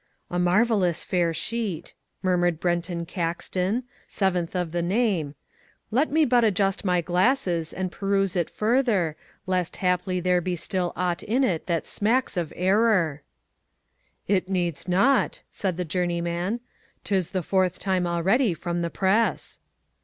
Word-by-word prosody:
"A 175 Hz, -, -1 dB
marvellous 185 Hz, -1 st, +2 dB
fair 175 Hz, -2 st, +1 dB
sheet," 215 Hz, 0 st, -3 dB, 0.3 s
murmured 175 Hz, -3 st, +2 dB
Brenton 175 Hz, -1 st, -1 dB
Caxton, 180 Hz, +5 st, -2 dB, 0.2 s
seventh 185 Hz, -3 st, -1 dB
of 180 Hz, -3 st, -1 dB
the 175 Hz, +1 st, -1 dB
name, 180 Hz, -6 st, 0 dB, 0.6 s
"let 265 Hz, +8 st, +2 dB
me 315 Hz, +1 st, +4 dB
but 245 Hz, -2 st, +3 dB
adjust 195 Hz, -2 st, +1 dB
my 180 Hz, -3 st, +2 dB
glasses 180 Hz, -, +1 dB
and 185 Hz, -1 st, -3 dB
peruse 195 Hz, -1 st, 0 dB
it 175 Hz, -3 st, 0 dB
further 215 Hz, -, +1 dB, 0.3 s
lest 180 Hz, -2 st, -1 dB
haply 180 Hz, 0 st, 0 dB
there 180 Hz, 0 st, +2 dB
be 180 Hz, +1 st, -2 dB
still 180 Hz, +1 st, -2 dB
aught 180 Hz, -1 st, -1 dB
in 250 Hz, +6 st, +1 dB
it 175 Hz, -11 st, 0 dB
that 170 Hz, -2 st, 0 dB
smacks 235 Hz, +4 st, 0 dB
of 170 Hz, -4 st, -2 dB
error." 185 Hz, -5 st, +2 dB, 1.1 s
"It 190 Hz, -1 st, +1 dB
needs 175 Hz, -4 st, -2 dB
not," 195 Hz, +10 st, +2 dB
said 185 Hz, -4 st, -2 dB
the 180 Hz, -, -2 dB
journeyman, 175 Hz, +5 st, -1 dB, 0.4 s
"'tis 190 Hz, -4 st, 0 dB
the 185 Hz, -2 st, -2 dB
fourth 185 Hz, 0 st, +1 dB
time 185 Hz, -2 st, 0 dB
already 185 Hz, +5 st, +2 dB
from 175 Hz, +1 st, -3 dB
the 170 Hz, -, -1 dB
press." 200 Hz, +6 st, 0 dB
180 Hz, 140 wpm, -25 LUFS, 175-205 Hz, 1.1 s, me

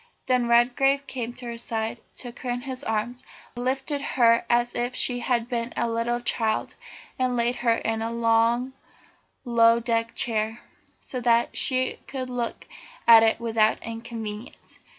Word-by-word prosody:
Then 250 Hz, -2 st, +2 dB
Redgrave 255 Hz, +4 st, +3 dB
came 245 Hz, -3 st, -4 dB
to 245 Hz, -, -8 dB
her 235 Hz, -1 st, -6 dB
side, 225 Hz, 0 st, -3 dB
took 245 Hz, -2 st, -7 dB
her 255 Hz, -, -5 dB
in 245 Hz, 0 st, -2 dB
his 260 Hz, +1 st, -6 dB
arms, 235 Hz, +3 st, -2 dB, 0.3 s
lifted 265 Hz, +4 st, -2 dB
her 235 Hz, -4 st, +3 dB
as 240 Hz, 0 st, +2 dB
if 245 Hz, +1 st, -2 dB
she 245 Hz, -1 st, +1 dB
had 240 Hz, -2 st, 0 dB
been 240 Hz, -1 st, -3 dB
a -, -, +1 dB
little 230 Hz, +1 st, -1 dB
child, 225 Hz, -2 st, 0 dB, 0.5 s
and 255 Hz, -1 st, +1 dB
laid 240 Hz, +1 st, +1 dB
her 235 Hz, -1 st, +2 dB
in 225 Hz, 0 st, -2 dB
a 225 Hz, -, -2 dB
long, 235 Hz, +2 st, +2 dB, 0.7 s
low 230 Hz, -1 st, +5 dB
deck 230 Hz, -1 st, -1 dB
chair, 220 Hz, 0 st, -1 dB, 0.4 s
so 255 Hz, -, -5 dB
that 235 Hz, 0 st, +2 dB
she 255 Hz, -2 st, 0 dB
could 260 Hz, -2 st, -5 dB
look 240 Hz, -2 st, -4 dB, 0.4 s
at 230 Hz, -1 st, +10 dB
it 225 Hz, 0 st, +3 dB
without 225 Hz, -2 st, +2 dB
inconvenience. 225 Hz, -1 st, -7 dB
235 Hz, 155 wpm, -25 LUFS, 230-250 Hz, 0.7 s, at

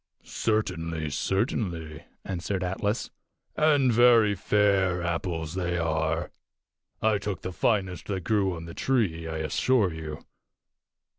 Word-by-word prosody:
"Certainly, 85 Hz, -8 st, -1 dB
certainly," 85 Hz, -, -2 dB, 0.2 s
answered 95 Hz, 0 st, -3 dB
Atlas, 100 Hz, +4 st, -2 dB, 0.4 s
"and 145 Hz, -5 st, +4 dB
very 115 Hz, -3 st, +6 dB
fair 95 Hz, -2 st, +2 dB
apples 85 Hz, -2 st, -2 dB
they 90 Hz, -1 st, -1 dB
are. 80 Hz, 0 st, -1 dB, 0.7 s
I 110 Hz, -2 st, +3 dB
took 100 Hz, -3 st, -4 dB
the 95 Hz, -, -4 dB
finest 95 Hz, -4 st, 0 dB
that 95 Hz, -3 st, -3 dB
grew 100 Hz, -2 st, +1 dB
on 80 Hz, 0 st, -7 dB
the 85 Hz, -, -8 dB
tree, 95 Hz, -12 st, 0 dB
I 80 Hz, 0 st, -4 dB
assure 95 Hz, +5 st, +1 dB
you. 80 Hz, -1 st, -7 dB
90 Hz, 120 wpm, -27 LUFS, 80-105 Hz, 0.7 s, very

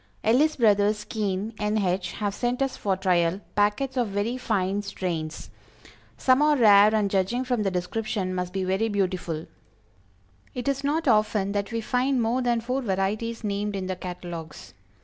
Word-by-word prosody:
Ellis 290 Hz, +8 st, +3 dB
Brothers, 210 Hz, -2 st, +3 dB
Keene, 210 Hz, 0 st, -3 dB
N. 210 Hz, +1 st, 0 dB
H., 185 Hz, -3 st, -1 dB
have 205 Hz, -2 st, -2 dB
sent 245 Hz, +4 st, -1 dB
us 270 Hz, -, -2 dB
for 195 Hz, -2 st, -1 dB
trial, 180 Hz, -1 st, +1 dB
packets 210 Hz, +6 st, +1 dB
of 245 Hz, -2 st, +2 dB
very 205 Hz, +4 st, -1 dB
fine 205 Hz, -5 st, -1 dB
strains; 175 Hz, -6 st, -4 dB, 0.7 s
some 255 Hz, +1 st, +3 dB
are 300 Hz, 0 st, +4 dB
rare, 210 Hz, -2 st, +6 dB
and, 210 Hz, -2 st, +2 dB
judging 195 Hz, +6 st, 0 dB
from 245 Hz, -3 st, -1 dB
the 200 Hz, -, +1 dB
description, 185 Hz, +1 st, -2 dB
must 180 Hz, -1 st, -3 dB
be 190 Hz, 0 st, -2 dB
very 190 Hz, +4 st, 0 dB
beautiful. 180 Hz, -5 st, -2 dB, 1.1 s
It 250 Hz, +1 st, -4 dB
is 275 Hz, 0 st, 0 dB
not 300 Hz, +3 st, 0 dB
often 215 Hz, -3 st, +2 dB
that 200 Hz, +1 st, -2 dB
we 230 Hz, 0 st, -2 dB
find 255 Hz, +3 st, +1 dB
more 235 Hz, +3 st, +1 dB
than 240 Hz, -2 st, +1 dB
four 255 Hz, +4 st, -2 dB
varieties 215 Hz, +2 st, -2 dB
named 205 Hz, 0 st, -2 dB
in 190 Hz, -1 st, -3 dB
the 185 Hz, 0 st, -3 dB
catalogues. 175 Hz, -3 st, -8 dB
205 Hz, 170 wpm, -25 LUFS, 190-240 Hz, 1.1 s, rare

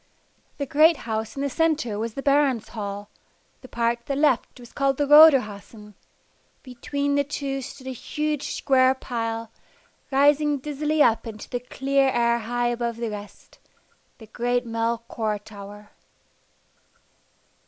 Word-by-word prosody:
The 280 Hz, -, -2 dB
great 310 Hz, +4 st, +4 dB
house 220 Hz, -1 st, -3 dB
in 275 Hz, -, -3 dB
the 280 Hz, -, 0 dB
centre 305 Hz, -10 st, 0 dB
was 225 Hz, 0 st, -4 dB
the 275 Hz, -, -5 dB
Baron's 275 Hz, -5 st, +2 dB
Hall, 205 Hz, -2 st, -6 dB, 0.5 s
the 255 Hz, -, -12 dB
part 235 Hz, -1 st, -1 dB
to 235 Hz, -, -35 dB
the 275 Hz, -, -1 dB
left 275 Hz, -3 st, +1 dB
was 240 Hz, -1 st, -13 dB
called 275 Hz, -1 st, 0 dB
the 290 Hz, -, +1 dB
Roderhausen; 230 Hz, -8 st, +5 dB, 0.7 s
between 280 Hz, +3 st, -3 dB
the 285 Hz, 0 st, +2 dB
two 275 Hz, -1 st, -4 dB
stood 260 Hz, +1 st, -10 dB
a 260 Hz, -, -4 dB
huge 300 Hz, +3 st, -3 dB
square 260 Hz, -1 st, +3 dB
pile, 230 Hz, -3 st, -4 dB, 0.6 s
rising 290 Hz, +2 st, +3 dB
dizzily 300 Hz, +2 st, 0 dB
up 225 Hz, 0 st, +2 dB
into 215 Hz, -2 st, -8 dB
the 245 Hz, -, -3 dB
clear 270 Hz, +2 st, 0 dB
air 235 Hz, -1 st, +1 dB
high 240 Hz, +2 st, -1 dB
above 235 Hz, -1 st, -3 dB
the 230 Hz, -2 st, -3 dB
rest 205 Hz, 0 st, -11 dB, 0.6 s
the 225 Hz, -, -13 dB
great 245 Hz, +3 st, -1 dB
Melchior 230 Hz, -1 st, -2 dB
Tower. 205 Hz, 0 st, -12 dB
245 Hz, 145 wpm, -24 LUFS, 225-280 Hz, 0.7 s, Roderhausen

